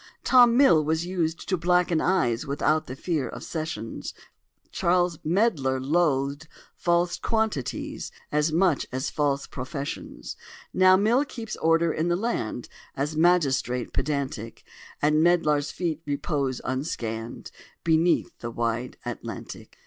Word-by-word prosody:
Tom 245 -2 +6
Mill 215 - +6
was 160 +2 0
used 170 -3 -2
to 185 - +1
blacken 175 -1 +2
eyes 150 -8 +1
Without 155 +2 +1
the 130 - -6
fear 155 -2 -2
of - - -8
sessions: 155 -9 -5 0.6
Charles 175 -2 +1
Medlar 155 - +1
loathed 140 0 0 0.3
false 175 0 +1
quantities 210 - -2 0.2
As 150 +1 +2
much 170 -2 +2
as 130 +1 -2
false 145 -2 0
professions: 140 +2 -6 0.4
Now 185 0 +6
Mill 225 +7 +3
keeps 230 -6 -7
order 165 0 +2
in 160 +2 -1
the 175 - +2
land, 175 - -2 0.3
A 140 +2 0
magistrate 145 -7 +2
pedantic: 135 -6 -3 0.4
And 150 +1 +4
Medlar's 150 -4 +3
feet 165 -3 -3
repose 140 -3 -1
unscanned 120 -4 -4 0.3
Beneath 165 +1 +2
the 120 - -5
wide 115 +1 -2
Atlantic." - - -7
155 Hz, 125 wpm, -26 LUFS, 135-175 Hz, 0.6 s, Tom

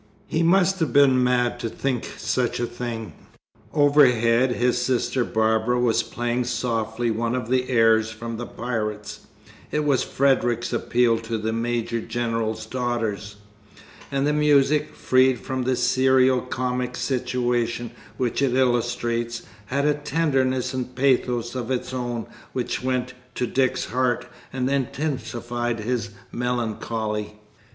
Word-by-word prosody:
He 160 - -1
must 190 +2 +3
have 160 -7 0
been 130 -2 +5
mad 125 -1 +1
to 115 - -3
think 130 +1 -3
such 125 -2 -1
a 120 - +1
thing. 120 -2 -5 0.6
Overhead 130 -4 +4
his 125 0 +1
sister 125 0 +1
Barbara 110 +2 +1
was 120 -2 +3
playing 120 +1 -2
softly 115 -1 -1
one 115 +2 -1
of 125 -3 -3
the 130 0 +1
airs 115 -2 +4
from 115 +1 -6
"The 120 - -5
Pirates" 105 -3 -4 0.4
(it 150 0 -1
was 140 -3 +3
Frederic's 120 -3 +1
appeal 120 -2 +2
to 115 0 -3
the 110 +1 -2
Major 115 0 -1
General's 115 -2 -2
daughters), 115 -5 -2 0.8
and 140 0 +1
the 150 - +2
music, 150 0 +3
freed 130 0 +3
from 130 -2 -3
the 130 0 +2
serio 130 0 +3
comic 125 0 -2
situation 120 -2 -1 0.3
which 125 +1 -1
it 130 -3 +2
illustrates, 120 -2 0 0.2
had 140 +5 0
a 150 - +4
tenderness 135 -4 0
and 125 -1 -4
pathos 125 -3 +1
of 125 -2 -4
its 130 0 -2
own 120 -3 -3 0.3
which 125 -2 -2
went 130 0 -1 0.2
to 125 - 0
Dick's 130 +2 0
heart 125 +2 0 0.3
and 130 -1 -1
intensified 120 -4 -2
his 115 -1 -2 0.2
melancholy. 110 -3 -2
125 Hz, 135 wpm, -24 LUFS, 115-130 Hz, 0.8 s, been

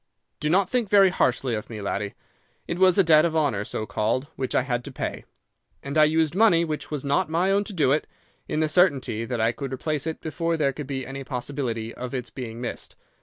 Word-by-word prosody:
Do 150 - -1
not 185 +3 +3
think 240 -1 0
very 195 -2 +6
harshly 130 -7 +1
of 110 +3 -4
me, 110 -2 -6
laddie. 100 0 -3 0.5
It 170 - -3
was 185 -1 +5
a 195 - +6
debt 155 -2 +6
of 165 -2 0
honour, 140 -10 +1
so 110 - -4
called, 110 +6 -1
which 130 - -3
I - - +3
had 125 -2 -2
to 140 - -7
pay, - - -5 0.6
and 140 +1 -5
I 155 -1 +7
used 160 0 +2
money 180 -4 +4
which 155 -2 -4
was 145 -2 -4
not 150 +5 +1
my 175 +4 +1
own 200 +1 +3
to 205 - -7
do 155 -7 +2
it, 150 +2 +1 0.4
in 155 - -1
the 155 - +2
certainty 140 - +2
that 120 0 -3
I 110 +1 +3
could 135 +2 -6
replace 150 +3 -2
it 160 - -3
before 165 +1 -2
there 140 -3 +1
could 150 -1 -7
be 135 -2 -3
any 135 +2 -6
possibility 125 -4 -4
of 125 +1 -6
its 125 -2 -4
being 115 -3 -7
missed. 120 -1 -5
145 Hz, 230 wpm, -25 LUFS, 125-165 Hz, 0.6 s, I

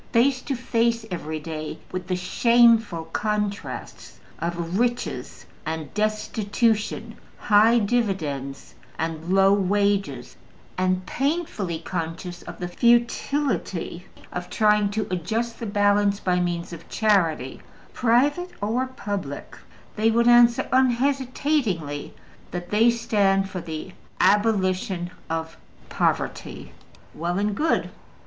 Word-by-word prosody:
Face 255 +2 +3
to 275 - -3
face 235 -1 0
every 155 -3 -4
day 155 0 -6
with 185 -1 -5
the 185 - 0
shameful 225 -1 +3
contrasts 210 -1 -3 0.2
of 170 +2 -2
riches 240 0 -2 0.2
and 160 -1 -5
destitution, 215 +1 0 0.2
high 220 +2 +5
dividends 185 - -1 0.2
and 160 +1 -3
low 195 +1 +5
wages, 200 -8 0 0.4
and 185 0 0
painfully 270 - -2
conscious 170 +1 -5
of - - -9
the 175 - -4
futility 235 - 0 0.3
of 180 0 -5
trying 210 -2 +3
to 215 +1 -2
adjust 220 +7 -2
the 230 - -4
balance 205 0 +2
by 180 -3 +1
means 175 -1 -2
of 165 -1 -11
charity, 170 - +1 0.3
private 285 +9 +2
or 230 +6 0
public, 205 - -5 0.4
they 220 +1 +3
would 235 +1 +3
answer 240 0 +6
unhesitatingly 255 - +1 0.4
that 175 0 -6
they 220 +3 +5
stand 205 -5 +2
for 185 -2 -5
the 165 +2 -6 0.3
ABOLITION 190 -4 +2 0.2
OF 160 0 -3 0.3
POVERTY. - - -2 0.4
Well 175 +2 -2
and 205 +1 0
good! 315 +10 0
205 Hz, 110 wpm, -24 LUFS, 175-235 Hz, 0.4 s, answer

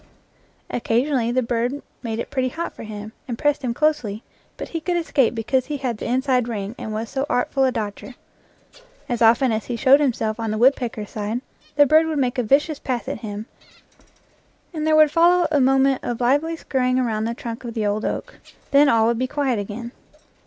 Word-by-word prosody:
Occasionally 240 +1 0
the 255 +1 +1
bird 240 +4 -1 0.2
made 225 -3 -4
it 235 - -5
pretty 260 -2 0
hot 335 +6 -5
for - - -11
him, 215 -1 -7 0.2
and 240 -3 -4
pressed 290 +2 +1
him 250 -3 -1
closely, 245 -6 0 0.3
but - - -6
he 330 - -4
could 350 +2 -1
escape 275 -8 +1
because 250 +3 0
he 295 -1 -3
had 250 -5 -3
the - - -4
inside 255 0 +1
ring, 210 -3 -4
and 220 - -5
was 220 +2 -3
so 270 +3 -3
artful 265 +2 +1
a 260 - +2
dodger. 220 +2 -5 0.9
As 240 -1 -2
often 235 +3 +5
as 220 -1 -2
he 240 - -3
showed 265 +4 +5
himself 230 -6 0
on 225 -1 -2
the 215 - -1
woodpecker's 240 -4 +1
side, 215 +3 -3 0.3
the 290 - +6
bird 315 +3 +4
would 315 -2 -2
make 255 -1 0
a - - +4
vicious 285 +6 +2
pass 250 -3 -3
at - - -4
him; 210 -2 -6 1.3
and 310 -1 -2
there 310 - +4
would 310 -1 +6
follow 345 +2 +4
a 290 -3 +3
moment 270 0 +3
of 240 -1 -3
lively 290 +7 +1
skurrying 255 -5 0
around 220 -4 0
the 230 +1 -2
trunk 230 +1 -7
of 235 -1 -7
the 220 -2 -1
old 205 +1 -1
oak; - - -4 0.3
then 280 +1 +6
all 225 -3 +4
would 235 0 +1
be 255 - 0
quiet 270 -5 -1
again. 220 +4 -6
250 Hz, 205 wpm, -22 LUFS, 225-280 Hz, 1.3 s, the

